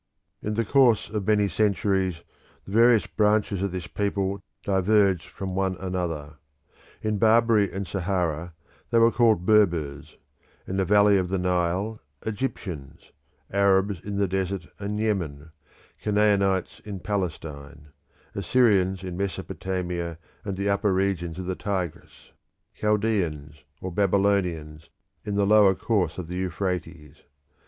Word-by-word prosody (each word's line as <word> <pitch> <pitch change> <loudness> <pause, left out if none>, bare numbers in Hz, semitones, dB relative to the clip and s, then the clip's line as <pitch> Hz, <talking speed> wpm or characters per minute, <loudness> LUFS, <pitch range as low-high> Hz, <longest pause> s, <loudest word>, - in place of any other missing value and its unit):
In 105 0 -3
the 115 +1 0
course 125 -2 +3
of 105 -3 -3
many 105 -1 +3
centuries 95 -2 0 0.4
the - - -10
various 115 +1 +5
branches 105 -2 +1
of 100 -1 -1
this 90 -2 -5
people 100 -1 -2 0.2
diverged 95 -2 +2
from 95 -1 -6
one 95 0 0
another. 85 -5 -4 0.7
In 105 -1 -1
Barbary 110 -2 +4
and 95 +1 -4
Sahara 85 -3 -2 0.3
they 115 - +2
were 115 0 +6
called 110 -7 +3
Berbers; 80 -8 +1 0.5
in 95 - -4
the 95 - +1
valley 100 +1 +5
of 90 -1 -2
the 95 - 0
Nile, 90 +4 0 0.3
Egyptians; 95 - -5 0.4
Arabs, 100 -1 +3
in 100 0 -5
the 100 -1 +2
desert 95 +1 -2
and 105 +1 -3
in 110 - 0
Yemen; 80 -8 -2 0.5
Canaanites, 100 -3 +1
in 100 -2 -6
Palestine; 75 -7 -5 0.4
Assyrians, 95 -2 +2
in 90 -2 -5
Mesopotamia 90 -3 -3 0.3
and 100 -2 -4
the 100 +1 -1
upper 100 0 +2
regions 95 -3 -1
of 95 - -5
the 95 - -2
Tigris; 90 -4 -5 0.4
Chaldeans 90 - -1 0.2
or 95 - -5
Babylonians, 90 -5 0 0.3
in 105 - -3
the 100 0 +2
lower 100 -2 +5
course 90 -6 0
of 90 -3 -5
the 90 +2 -5
Euphrates. 90 -4 -4
95 Hz, 130 wpm, -25 LUFS, 90-105 Hz, 0.7 s, were